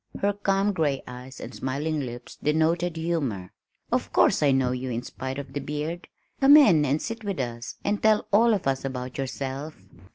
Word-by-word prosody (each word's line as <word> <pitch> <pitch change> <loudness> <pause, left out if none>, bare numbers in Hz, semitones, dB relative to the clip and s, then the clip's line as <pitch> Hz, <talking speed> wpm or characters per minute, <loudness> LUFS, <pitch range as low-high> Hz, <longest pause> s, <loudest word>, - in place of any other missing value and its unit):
her 205 +1 +1
calm 200 0 +1
gray 150 -6 0
eyes 125 +2 -10
and - - -8
smiling 150 +4 -2
lips 120 -3 -7
denoted 165 +3 +1
humor. 140 - -2 0.4
"Of - - 0
course - - +4
I 145 - +4
know 130 -2 +2
you 125 +1 -3
in 120 0 -3
spite 130 +1 -6
of 140 -2 -7
the 145 - -2
beard. 150 +5 -4 0.3
Come 280 +2 +8
in 175 - +6
and 145 +2 +1
sit 225 +3 -5
with 200 -5 -3
us 120 0 -4
and 205 0 0
tell 215 -1 +3
all 225 +2 +5
of 195 - -4
us 135 -1 0
about 130 -1 -5
yourself." 135 +3 -4
145 Hz, 190 wpm, -26 LUFS, 130-175 Hz, 0.4 s, Come